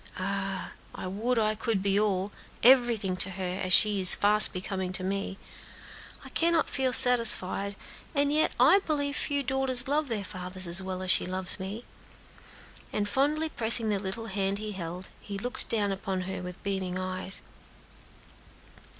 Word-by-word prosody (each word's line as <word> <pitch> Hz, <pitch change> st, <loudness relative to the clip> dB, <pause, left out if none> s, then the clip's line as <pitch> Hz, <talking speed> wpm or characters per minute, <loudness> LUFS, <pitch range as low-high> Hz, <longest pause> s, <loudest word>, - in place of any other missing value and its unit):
Ah! 195 Hz, 0 st, -4 dB, 0.2 s
I -, -, -7 dB
would 220 Hz, +7 st, -2 dB
I 215 Hz, -1 st, +1 dB
could 215 Hz, -2 st, -2 dB
be 200 Hz, 0 st, +1 dB
all 200 Hz, -1 st, -1 dB, 0.3 s
everything 235 Hz, -7 st, +3 dB
to 185 Hz, -, +1 dB
her, 185 Hz, 0 st, -5 dB
as 185 Hz, -, -3 dB
she 205 Hz, 0 st, +4 dB
is 185 Hz, -, +11 dB
fast 210 Hz, +1 st, +4 dB
becoming 185 Hz, 0 st, -5 dB
to 185 Hz, 0 st, -3 dB
me. 195 Hz, 0 st, -4 dB, 0.9 s
I -, -, -11 dB
cannot 335 Hz, 0 st, 0 dB
feel 265 Hz, -2 st, -1 dB
satisfied, 230 Hz, -5 st, +5 dB, 0.4 s
and 285 Hz, 0 st, +1 dB
yet 310 Hz, +1 st, +2 dB
I 300 Hz, +11 st, +5 dB
believe 290 Hz, -5 st, -3 dB
few 285 Hz, -1 st, -2 dB
daughters 265 Hz, -1 st, +1 dB
love 295 Hz, +2 st, -1 dB
their 220 Hz, -5 st, -4 dB
fathers 185 Hz, 0 st, -5 dB
as 170 Hz, +2 st, 0 dB
well 185 Hz, 0 st, -6 dB
as 185 Hz, -, 0 dB
she -, -, +1 dB
loves 185 Hz, +1 st, 0 dB
me;" 200 Hz, +5 st, -7 dB, 1.1 s
and 205 Hz, -1 st, -2 dB
fondly 295 Hz, +8 st, -1 dB
pressing 230 Hz, -4 st, +2 dB
the 205 Hz, -2 st, -1 dB
little 195 Hz, +4 st, -6 dB
hand 195 Hz, -2 st, -3 dB
he 215 Hz, 0 st, -6 dB
held, 180 Hz, -1 st, -7 dB
he 200 Hz, -1 st, -8 dB
looked 245 Hz, +5 st, -2 dB
down 210 Hz, -3 st, 0 dB
upon 190 Hz, -1 st, -4 dB
her 185 Hz, 0 st, -6 dB
with 180 Hz, 0 st, -10 dB
beaming 190 Hz, -2 st, -4 dB
eyes. 185 Hz, 0 st, -5 dB
200 Hz, 165 wpm, -27 LUFS, 185-245 Hz, 1.1 s, is